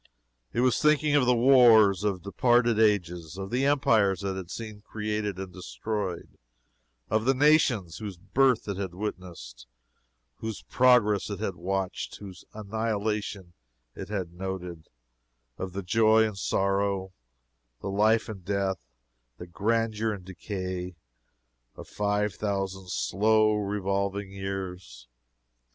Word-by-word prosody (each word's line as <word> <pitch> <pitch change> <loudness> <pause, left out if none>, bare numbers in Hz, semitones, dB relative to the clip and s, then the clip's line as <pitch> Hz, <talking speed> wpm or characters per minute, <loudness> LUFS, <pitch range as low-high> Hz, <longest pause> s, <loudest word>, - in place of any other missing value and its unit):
It 120 - 0
was 125 0 +2
thinking 150 0 +3
of 135 -4 +3
the 125 - +5
wars 115 -6 +6
of 100 -4 -1
departed 120 +2 +2
ages; 90 -6 +1
of 95 +1 -6
the 130 +3 +1
empires 110 -10 +2
it 95 -1 -2
had 95 -2 -7
seen 110 -1 -7
created 105 -2 -3
and 95 -1 -7
destroyed; 95 0 -5 0.7
of 110 +1 +1
the 135 +1 +3
nations 130 - +3
whose 105 -4 -6
birth 120 +7 +2
it 100 -2 -3
had 95 -3 -4
witnessed, 85 - -7 0.7
whose 110 -8 -6
progress 115 -1 +3
it 100 -2 -5
had 105 -3 -2
watched, 95 +2 -3
whose 95 -3 -11
annihilation 105 -3 -3 0.4
it - - -8
had 95 -5 -4
noted; 90 -3 -6 0.7
of 95 -1 -5
the 100 +1 -4
joy 110 +3 +4
and 105 -3 -3
sorrow, 95 0 0 0.7
the 100 - -4
life 110 +3 +3
and 100 -5 -8
death, 95 -1 -1 0.6
the 90 - -8
grandeur 110 +4 0
and 95 -3 -9
decay, 95 -1 -5 0.8
of - - -10
five 105 0 -1
thousand 95 -3 -3
slow 110 +3 +2
revolving 100 -1 -2
years. 95 -10 -6
100 Hz, 130 wpm, -27 LUFS, 95-110 Hz, 0.8 s, wars